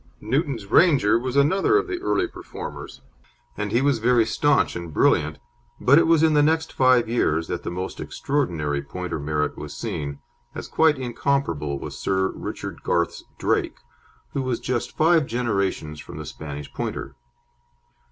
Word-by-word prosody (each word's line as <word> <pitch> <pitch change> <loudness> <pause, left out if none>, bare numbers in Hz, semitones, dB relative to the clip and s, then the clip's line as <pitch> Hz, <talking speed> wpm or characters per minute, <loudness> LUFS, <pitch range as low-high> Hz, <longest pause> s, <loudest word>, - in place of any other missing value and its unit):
Newton's 130 - -1
Ranger 130 - +4
was 130 +1 -4
another 190 - +4
of 415 - +1
the 365 -2 -4
early 375 -1 +1
performers, 355 - -8 0.5
and 105 0 -3
he 120 +4 +2
was 140 -4 +2
very 120 0 +4
staunch 145 +6 +2
and 85 -2 -6
brilliant, 75 0 +2 0.4
but 140 +5 +6
it - - +3
was 165 -1 +4
in 160 -1 +4
the 150 - +5
next 160 +2 +1
five 130 -3 +4
years 80 -9 +1
that 90 - -3
the - - -4
most 90 +2 -5
extraordinary 80 - -1
Pointer 85 +3 -5
merit 75 +1 -2
was - - -7
seen, 70 -1 -4 0.4
as - - -6
quite 160 -2 +3
incomparable 120 - -1
was - - -7
Sir 95 0 +1
Richard - - -6
Garth's 85 -1 -1
Drake, - - 0 0.6
who 140 - -1
was 130 -2 -1
just 125 -2 -3
five 160 -2 +4
generations 100 -10 -1
from - - -10
the 75 - -6
Spanish 75 -1 -8
Pointer. - - -4
120 Hz, 160 wpm, -24 LUFS, -, 0.6 s, but